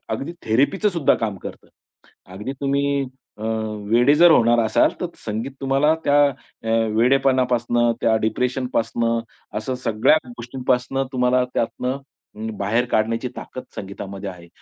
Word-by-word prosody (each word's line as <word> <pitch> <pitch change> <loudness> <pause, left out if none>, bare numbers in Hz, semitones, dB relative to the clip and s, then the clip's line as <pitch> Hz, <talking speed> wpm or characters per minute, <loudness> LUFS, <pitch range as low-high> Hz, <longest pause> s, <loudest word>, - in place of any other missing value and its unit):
अगदी 165 +5 -6
थेरपीचं 140 - +2
सुद्धा 170 -7 +2
काम 105 -3 -2
करतं. - - -8 0.7
अगदी 105 +8 -5
तुम्ही, 140 0 +1 0.3
अ, 110 - -8 0.5
वेडे 125 +5 +5
जर 170 +2 +7
होणार 120 -3 +5
असाल 110 - +3
तर - - -1 0.2
संगीत 110 +6 -3
तुम्हाला 135 +3 +3
त्या 145 0 +4
अ, 125 -3 -10 0.3
वेडेपणापासून 125 -2 +3
त्या 110 - +3
डिप्रेशन 125 +3 -1
पासून 115 +1 0 0.5
असं 120 +4 -3
सगळ्या 110 +8 +4
गोष्टींपासून 125 +2 -1
तुम्हाला 125 0 +2
त्यातुन 125 +3 -1 0.4
उम्म, 110 +1 -5
बाहेर 115 +5 +1
काढण्याची 115 +1 0
ताकद 130 - -8
संगीतामध्ये 100 0 -6
आहे. 90 -2 -12
125 Hz, 130 wpm, -22 LUFS, 110-135 Hz, 0.7 s, जर